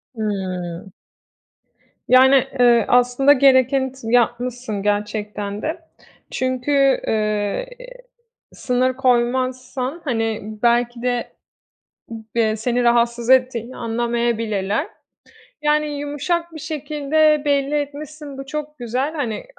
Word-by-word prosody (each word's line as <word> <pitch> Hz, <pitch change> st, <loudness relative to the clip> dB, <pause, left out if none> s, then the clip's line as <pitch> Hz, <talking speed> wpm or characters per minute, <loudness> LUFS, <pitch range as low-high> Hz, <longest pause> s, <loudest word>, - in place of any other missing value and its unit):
Hımm. 185 Hz, -4 st, -4 dB, 1.1 s
Yani, 265 Hz, +1 st, +6 dB
eee, 240 Hz, -3 st, +5 dB
aslında 250 Hz, +3 st, +4 dB
gerekeni 265 Hz, -1 st, +3 dB
t 265 Hz, -, -18 dB
yapmışsın 240 Hz, -3 st, 0 dB
gerçekten 210 Hz, 0 st, -2 dB
de. 320 Hz, +3 st, -3 dB, 0.5 s
Çünkü, 265 Hz, +2 st, +1 dB
eee, 215 Hz, -, -1 dB, 0.9 s
sınır 255 Hz, 0 st, 0 dB
koymazsan, 255 Hz, +3 st, -1 dB
hani, 225 Hz, -5 st, -1 dB, 0.2 s
belki 240 Hz, 0 st, +2 dB
de 245 Hz, -1 st, -2 dB, 0.8 s
b 225 Hz, 0 st, -4 dB
eee, 220 Hz, -1 st, +1 dB
seni 245 Hz, +3 st, 0 dB
rahatsız 235 Hz, 0 st, +2 dB
ettiğini 255 Hz, -2 st, +2 dB
anlamayabilirler. 230 Hz, -3 st, -1 dB
T -, -, -23 dB, 0.7 s
yani 300 Hz, 0 st, +2 dB
yumuşak 315 Hz, +4 st, -2 dB
bir 315 Hz, -, -8 dB
şekilde 305 Hz, 0 st, +1 dB
belli 285 Hz, 0 st, +1 dB
etmişsin, 290 Hz, 0 st, -5 dB
bu 270 Hz, -, -7 dB
çok 300 Hz, +2 st, -6 dB
güzel, 255 Hz, +5 st, -2 dB
hani, 245 Hz, -8 st, -3 dB
250 Hz, 100 wpm, -20 LUFS, 230-280 Hz, 1.1 s, Yani